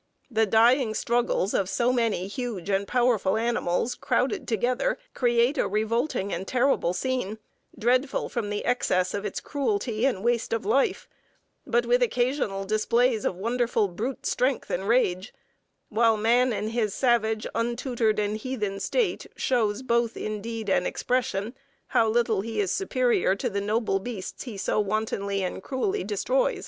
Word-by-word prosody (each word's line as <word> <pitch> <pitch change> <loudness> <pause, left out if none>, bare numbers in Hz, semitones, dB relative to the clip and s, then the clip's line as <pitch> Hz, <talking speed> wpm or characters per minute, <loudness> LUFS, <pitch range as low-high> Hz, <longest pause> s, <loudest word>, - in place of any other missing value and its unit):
The 220 -1 +2
dying 230 +2 +4
struggles 235 -5 0
of 190 -2 +1
so 240 +5 +1
many 230 -7 0
huge 205 -3 -4
and 195 +1 0
powerful 240 -5 +2
animals 230 -1 0
crowded 250 0 -1
together 245 - 0 0.2
create 240 +3 +2
a - - +2
revolting 220 +1 -1
and 190 +3 -4
terrible 250 -8 +2
scene, 250 -2 -2 0.4
dreadful 255 +5 +1
from 230 -4 -3
the 205 0 -3
excess 185 -7 +1
of 205 +1 -3
its 205 - -3
cruelty 275 - -1
and 205 -8 -2
waste 235 -1 0
of 225 -3 -2
life, 265 +6 +1 0.6
but 475 - +2
with - - +3
occasional 250 - 0
displays 220 +2 +1
of - - 0
wonderful 230 +1 0
brute 225 +9 -4
strength 255 0 0
and 190 +2 -2
rage; 205 -4 +1 0.5
while 225 0 +3
man 240 +4 +3
in 215 -1 -2
his 220 -3 -1
savage, 220 -4 +1
untutored, 235 -1 0
and 210 0 0
heathen 210 -5 -3
state 420 - -1
shows 225 -2 0
both 235 -2 +1
in 215 -1 -4
deed 225 0 -5
and 190 -2 +2
expression 235 -3 -1 0.4
how 225 - +3
little 225 -3 +2
he 220 +1 -4
is 195 -2 +1
superior 250 - +1
to 240 +4 -3
the 200 0 -1
noble 210 -1 0
beasts 200 +1 -6
he 230 -6 -7
so 195 - 0
wantonly 200 -1 -1
and 185 - -4
cruelly 380 - -2
destroys." - - 0
230 Hz, 155 wpm, -26 LUFS, 205-250 Hz, 0.6 s, dying